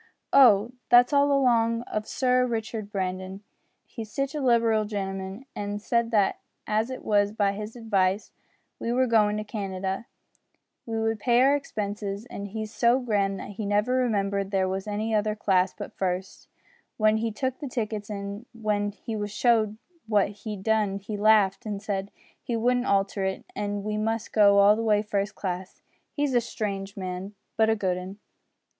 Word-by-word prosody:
"Oh! 235 Hz, -5 st, +6 dB, 0.2 s
that's 245 Hz, +3 st, +6 dB
all 285 Hz, 0 st, +4 dB
along 235 Hz, -4 st, +3 dB
of 215 Hz, -2 st, -4 dB
Sir 255 Hz, -1 st, +2 dB
Richard 220 Hz, -2 st, -4 dB
Brandon. 185 Hz, 0 st, -4 dB, 0.4 s
He's 220 Hz, -4 st, -8 dB
sitch 275 Hz, +4 st, -2 dB
a 300 Hz, -, -3 dB
liberal 230 Hz, -4 st, +3 dB
gentleman, 195 Hz, +2 st, -5 dB
an' 205 Hz, 0 st, -3 dB
said 235 Hz, +2 st, 0 dB
that 210 Hz, -4 st, +2 dB, 0.3 s
as 215 Hz, +3 st, 0 dB
it 260 Hz, -, -7 dB
was 205 Hz, -1 st, +3 dB
by 205 Hz, -2 st, +1 dB
his 210 Hz, +3 st, -6 dB
advice 205 Hz, -4 st, 0 dB, 0.5 s
we 230 Hz, -, -2 dB
were 255 Hz, +2 st, +3 dB
goin' 210 Hz, -3 st, +3 dB
to 215 Hz, -, -2 dB
Canada, 195 Hz, -1 st, -4 dB, 0.8 s
he 225 Hz, -, -3 dB
would 225 Hz, 0 st, 0 dB
pay 240 Hz, +2 st, +3 dB
our 275 Hz, +2 st, +5 dB
expenses; 205 Hz, -5 st, -4 dB
and 200 Hz, -, -5 dB
he's 215 Hz, +1 st, -6 dB
so 240 Hz, +2 st, +3 dB
grand 200 Hz, -5 st, 0 dB
that -, -, -7 dB
he 210 Hz, +1 st, -5 dB
never 210 Hz, +5 st, +1 dB
remembered 200 Hz, -6 st, 0 dB
there 190 Hz, -2 st, +1 dB
was 190 Hz, +2 st, -3 dB
any 215 Hz, +2 st, -2 dB
other 210 Hz, 0 st, +1 dB
class 190 Hz, -3 st, +2 dB
but -, -, -8 dB
first, 185 Hz, 0 st, -3 dB, 0.5 s
when 215 Hz, 0 st, +4 dB
he 225 Hz, +1 st, -1 dB
took 260 Hz, +4 st, -3 dB
the 285 Hz, -, -5 dB
tickets, 215 Hz, -4 st, -3 dB
an' 200 Hz, +2 st, -6 dB
when 210 Hz, -2 st, -1 dB
he 220 Hz, +2 st, -6 dB
was 205 Hz, -1 st, -3 dB
show'd 215 Hz, -1 st, +2 dB, 0.3 s
what 210 Hz, -3 st, +3 dB
he'd 205 Hz, -1 st, -7 dB
done 215 Hz, -3 st, +1 dB
he 200 Hz, +2 st, -6 dB
laughed 205 Hz, 0 st, +4 dB
an' 205 Hz, -2 st, -3 dB
said 200 Hz, -1 st, -3 dB, 0.3 s
he 235 Hz, -, -3 dB
wouldn't 245 Hz, +2 st, +1 dB
alter 195 Hz, 0 st, +1 dB
it, 190 Hz, 0 st, -2 dB
an' 205 Hz, -1 st, -3 dB
we 210 Hz, 0 st, -2 dB
must 225 Hz, +1 st, -2 dB
go 200 Hz, -2 st, +6 dB
all 200 Hz, +1 st, +7 dB
the 225 Hz, -, -2 dB
way 210 Hz, -2 st, +2 dB
first 205 Hz, -1 st, -2 dB
class. 185 Hz, -1 st, -5 dB, 0.3 s
He's 290 Hz, -2 st, -1 dB
a 240 Hz, -, +4 dB
strange 200 Hz, -3 st, -4 dB
man, 185 Hz, +2 st, -5 dB, 0.2 s
but 220 Hz, 0 st, +3 dB
a 220 Hz, -, +3 dB
good 185 Hz, -4 st, -1 dB
'un!" 185 Hz, +2 st, -8 dB
210 Hz, 175 wpm, -26 LUFS, 200-230 Hz, 0.8 s, all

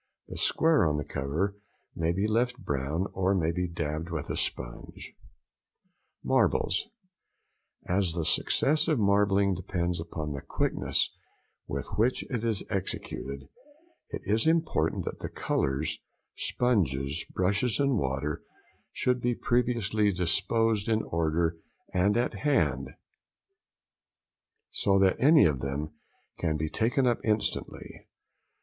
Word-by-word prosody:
The -, -, -7 dB
square 160 Hz, -1 st, +3 dB
on 75 Hz, -1 st, 0 dB
the 75 Hz, -, -2 dB
cover 80 Hz, +11 st, -2 dB, 0.4 s
may 85 Hz, 0 st, +1 dB
be 95 Hz, +4 st, 0 dB
left 120 Hz, +3 st, +1 dB
brown 75 Hz, -, -2 dB
or 95 Hz, +1 st, +1 dB
may 85 Hz, -3 st, +1 dB
be 90 Hz, +1 st, -1 dB
dabbed 80 Hz, 0 st, -3 dB
with 80 Hz, -3 st, -4 dB
a -, -, -2 dB
sponge. -, -, -5 dB, 1.1 s
Marbles.—As 135 Hz, -, -2 dB
the 85 Hz, -2 st, -2 dB
success 155 Hz, -, +2 dB
of 155 Hz, -3 st, +2 dB
marbling 100 Hz, -1 st, +3 dB
depends 90 Hz, -1 st, -2 dB
upon 80 Hz, -3 st, -5 dB
the 70 Hz, -, -5 dB
quickness -, -, 0 dB, 0.5 s
with -, -, -3 dB
which 120 Hz, +4 st, +2 dB
it 120 Hz, -3 st, -2 dB
is 110 Hz, -3 st, 0 dB
executed, 70 Hz, -7 st, -4 dB, 0.6 s
it -, -, -6 dB
is 110 Hz, +7 st, +1 dB
important 160 Hz, -, +1 dB
that -, -, -5 dB
the -, -, -5 dB
colours, 70 Hz, +3 st, -1 dB, 0.4 s
sponges, 75 Hz, -, 0 dB
brushes 100 Hz, +7 st, +1 dB
and 140 Hz, -5 st, +2 dB
water, 70 Hz, +2 st, -2 dB, 0.5 s
should 125 Hz, -1 st, 0 dB
be 120 Hz, 0 st, +1 dB
previously 115 Hz, -4 st, +1 dB
disposed 100 Hz, +5 st, +1 dB
in 110 Hz, -1 st, +2 dB
order 85 Hz, 0 st, 0 dB, 0.4 s
and 100 Hz, +3 st, +3 dB
at 120 Hz, -, +1 dB
hand, 145 Hz, -2 st, +1 dB, 1.8 s
so 100 Hz, -1 st, +2 dB
that 95 Hz, -1 st, +3 dB
any 150 Hz, +3 st, +7 dB
of 75 Hz, -4 st, +2 dB
them 70 Hz, +3 st, -3 dB, 0.5 s
can 80 Hz, -3 st, 0 dB
be 80 Hz, 0 st, -2 dB
taken 125 Hz, -, +1 dB
up 120 Hz, -2 st, +2 dB
instantly. 105 Hz, -1 st, -2 dB
95 Hz, 125 wpm, -28 LUFS, 80-115 Hz, 1.8 s, any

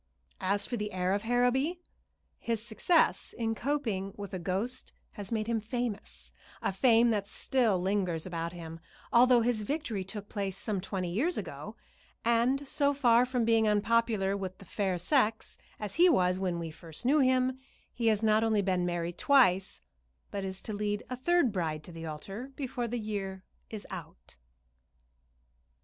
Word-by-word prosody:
As 200 Hz, +1 st, +1 dB
for 240 Hz, -, -3 dB
the 210 Hz, -2 st, -4 dB
heir 185 Hz, 0 st, 0 dB
of 200 Hz, -, 0 dB
Harrowby, 245 Hz, +8 st, +1 dB, 0.6 s
his 230 Hz, -2 st, -1 dB
success 320 Hz, +10 st, +2 dB
in 225 Hz, -1 st, 0 dB
coping 225 Hz, -7 st, -2 dB
with 205 Hz, -1 st, -7 dB
a 185 Hz, -, -2 dB
ghost 195 Hz, +9 st, -3 dB, 0.2 s
has 205 Hz, 0 st, -7 dB
made 220 Hz, -2 st, 0 dB
him 225 Hz, -1 st, 0 dB
famous, 230 Hz, -1 st, -4 dB, 0.3 s
a -, -, -1 dB
fame 230 Hz, +3 st, +5 dB
that 205 Hz, -2 st, -1 dB
still 230 Hz, -5 st, +1 dB
lingers 185 Hz, -3 st, 0 dB
about 170 Hz, -2 st, -3 dB
him, 165 Hz, -2 st, -8 dB, 0.3 s
although 245 Hz, 0 st, +6 dB
his 230 Hz, -2 st, +1 dB
victory 230 Hz, -4 st, -2 dB
took 205 Hz, +2 st, -7 dB
place 195 Hz, -3 st, -3 dB
some 205 Hz, -3 st, -2 dB
twenty 185 Hz, -2 st, -3 dB
years 290 Hz, -, 0 dB
ago; -, -, -6 dB, 0.5 s
and 245 Hz, +4 st, +2 dB
so 285 Hz, +1 st, +2 dB
far 245 Hz, -3 st, +4 dB
from 250 Hz, -2 st, 0 dB
being 225 Hz, -1 st, +4 dB
unpopular 210 Hz, -2 st, +2 dB
with 190 Hz, -2 st, -5 dB
the 195 Hz, -, -14 dB
fair 190 Hz, 0 st, -1 dB
sex, 220 Hz, -, +1 dB, 0.2 s
as 210 Hz, -2 st, -4 dB
he 355 Hz, +2 st, +6 dB
was 180 Hz, -, +3 dB
when 180 Hz, -3 st, -1 dB
we 165 Hz, -1 st, -4 dB
first 160 Hz, +6 st, -9 dB
knew 290 Hz, +4 st, +4 dB
him, 255 Hz, -1 st, +2 dB, 0.3 s
he 235 Hz, -2 st, -1 dB
has 220 Hz, -1 st, +3 dB
not 215 Hz, 0 st, +4 dB
only 220 Hz, -2 st, +2 dB
been 185 Hz, -2 st, +1 dB
married 175 Hz, 0 st, -3 dB
twice, 195 Hz, -10 st, +3 dB, 0.5 s
but 200 Hz, -, -3 dB
is 190 Hz, 0 st, -5 dB
to 215 Hz, -, -4 dB
lead 205 Hz, 0 st, -2 dB
a -, -, -1 dB
third 290 Hz, 0 st, +2 dB
bride 160 Hz, -5 st, -2 dB
to 175 Hz, -, -10 dB
the 165 Hz, -1 st, -7 dB
altar 195 Hz, -, -7 dB
before 250 Hz, -4 st, -3 dB
the 240 Hz, +2 st, -3 dB
year 195 Hz, -4 st, -4 dB, 0.3 s
is 215 Hz, -2 st, -7 dB
out. -, -, -10 dB
210 Hz, 170 wpm, -30 LUFS, 190-245 Hz, 0.6 s, although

